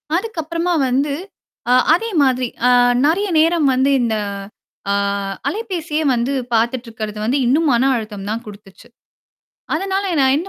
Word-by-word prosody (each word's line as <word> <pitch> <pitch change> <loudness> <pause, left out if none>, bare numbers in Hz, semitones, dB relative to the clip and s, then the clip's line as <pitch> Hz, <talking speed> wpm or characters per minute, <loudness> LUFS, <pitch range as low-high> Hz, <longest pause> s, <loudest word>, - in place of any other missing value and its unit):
அதுக்கப்பறமா 345 -3 -2
வந்து, 275 +3 0 0.6
அ - - +6 0.2
அதே 450 +7 0
மாதிரி 255 -2 +1 0.2
அ, - - +5 0.4
நெறைய 360 +7 +1
நேரம் 325 -2 +3
வந்து 265 +2 +2
இந்த 230 -2 0 0.8
ஆ, - - +2 0.5
அலைபேசியே 345 -7 -3
வந்து 240 +3 -1 0.2
பார்த்துட்டு 235 +2 0
இருக்கிறது 215 -1 -6
வந்து 255 +5 +1
இன்னும் 295 +6 +2
மன 260 +3 +3
அழுத்தம் 210 -4 -5
தான் 225 +2 -3
குடுத்துச்சு. 200 -2 -13 0.9
அதனால 385 +4 -1 0.2
நான் 265 0 +4
என்ன 350 +5 -6
270 Hz, 135 wpm, -18 LUFS, 235-335 Hz, 0.9 s, அ